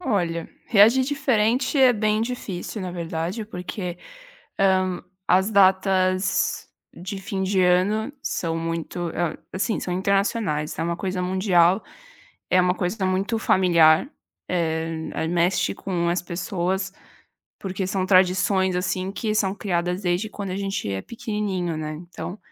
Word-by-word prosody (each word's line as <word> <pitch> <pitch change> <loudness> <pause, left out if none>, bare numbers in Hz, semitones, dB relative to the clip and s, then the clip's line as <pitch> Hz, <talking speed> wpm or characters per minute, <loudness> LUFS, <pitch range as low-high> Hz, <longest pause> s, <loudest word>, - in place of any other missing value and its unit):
Olha, 175 - -1 0.2
reagir 230 +4 +6
diferente 260 -1 +1
é 260 -2 +7
bem 215 -1 +1
difícil 220 -4 -4
na 185 - -4
verdade 170 +4 -3
porque, 180 -1 -5 0.6
hã, 185 -2 +2 0.3
as 190 +3 +4
datas 190 -1 +2 0.3
de 185 +3 -6
fim 190 0 -3
de 190 0 +2
ano 205 +8 +2
são 165 -1 -2
muito 165 +1 -3 0.4
assim 205 +4 -1
são 180 - -3
internacionais, 195 -4 0
é - - 0
uma 170 +1 -1
coisa 185 -1 -3
mundial, 185 0 +3 0.7
é 185 - +4
uma 180 0 +2
coisa 190 +2 -2
muito 195 +4 0
familiar, 170 - +4 0.4
eh, 160 -2 -1
ai 160 - -1
mexe 175 +2 +1
com 175 -3 -2
as 175 +1 0
pessoas, 185 +2 -2 0.7
porque 190 0 -3
são 185 0 -1
tradições 190 0 +3
assim 185 +1 -2
que 215 0 -2
são 195 -2 +1
criadas 180 -2 -2
desde 180 +4 0
quando 200 -2 -5
a 185 - -3
gente 195 - -3
é 95 0 -3
pequenininho 205 -7 -3
né. 155 0 -4
Então, 175 +4 -8
185 Hz, 135 wpm, -24 LUFS, 175-200 Hz, 0.7 s, é